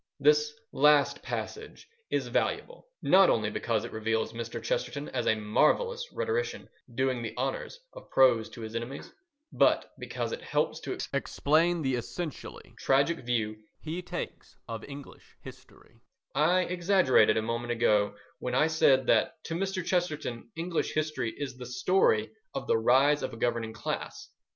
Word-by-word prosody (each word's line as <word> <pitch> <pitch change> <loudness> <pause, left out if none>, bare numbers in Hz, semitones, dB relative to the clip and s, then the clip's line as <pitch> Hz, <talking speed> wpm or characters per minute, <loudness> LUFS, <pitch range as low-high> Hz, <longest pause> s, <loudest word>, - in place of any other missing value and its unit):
This 450 0 +4 0.2
last 150 -1 +4
passage 440 +1 -6 0.2
is - - -1
valuable, - - -2 0.2
not 190 0 +6
only 110 -2 +1
because 110 -3 -1
it - - -8
reveals 110 +1 -1
Mr. 115 0 -5
Chesterton 325 - -3
as - - -2
a 110 - +4
marvellous 475 - +1
rhetorician 475 0 -2 0.3
doing 130 -1 0
the 115 - -6
honours - - -3
of - - -12
prose 125 -4 +4
to 115 - -10
his 110 0 -7
enemies, 120 +4 -6 0.4
but - - +3
because - - -4
it 480 - -4
helps - - -1
to - - -5 0.2
explain 165 +3 +1
the 135 -1 0
essentially 145 +6 -6
tragic 140 +5 +2
view 115 -3 -1 0.2
he 160 +3 -5
takes 175 - -7
of 115 -1 -6
English 140 0 -12
history. - - -15 0.3
I 165 +6 +3
exaggerated 175 - +3
a 110 - +1
moment 115 +1 -2
ago 105 -3 +2 0.2
when 125 0 -3
I 150 - +4
said 140 -5 +4
that 155 - +2
to 165 - -5
Mr. 190 0 -2
Chesterton 150 -11 -2
English 165 0 -2
history 155 -6 -1
is 135 -3 -5
the 125 -1 -8
story 125 - +2 0.2
of - - -3
the - - +2
rise 135 +6 +4
of - - -4
a - - -8
governing 115 -1 -1
class. 110 - -5
140 Hz, 155 wpm, -29 LUFS, 115-175 Hz, 0.4 s, not